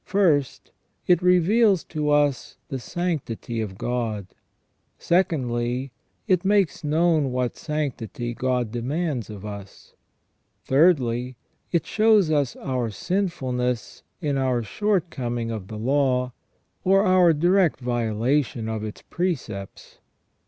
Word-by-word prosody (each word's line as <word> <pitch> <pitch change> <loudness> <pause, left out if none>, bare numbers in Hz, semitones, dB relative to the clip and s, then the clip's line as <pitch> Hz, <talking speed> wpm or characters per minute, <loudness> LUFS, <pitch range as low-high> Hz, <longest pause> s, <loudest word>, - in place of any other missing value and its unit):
First, 165 -9 +1 0.3
it 175 -2 +4
reveals 185 +2 +4
to 150 -1 -3
us 145 -2 +1
the 135 - -3
sanctity 130 -8 -3
of 95 -3 -5
God. 115 -4 -2 0.7
Secondly, 130 -7 0 0.4
it 185 -4 +2
makes 195 -4 +2
known 155 -2 +2
what 125 -1 -1
sanctity 125 - -4
God 125 -2 -1
demands 130 - -2
of 105 -1 -8
us. 100 -2 -9 0.7
Thirdly, 130 -5 +2 0.4
it 170 - +1
shows 215 -6 +3
us 145 -5 +1
our 125 -3 -2
sinfulness 125 - -2 0.2
in 145 -4 0
our 130 -3 +1
shortcoming 130 - -1
of 105 -4 -5
the 110 - -7
law, 125 +1 +1 0.5
or 195 +1 +4
our 185 -3 +5
direct 175 +2 +3
violation 120 +1 0
of 110 -1 -3
its 110 -1 -7
precepts. 130 - -4
135 Hz, 110 wpm, -24 LUFS, 120-175 Hz, 0.7 s, our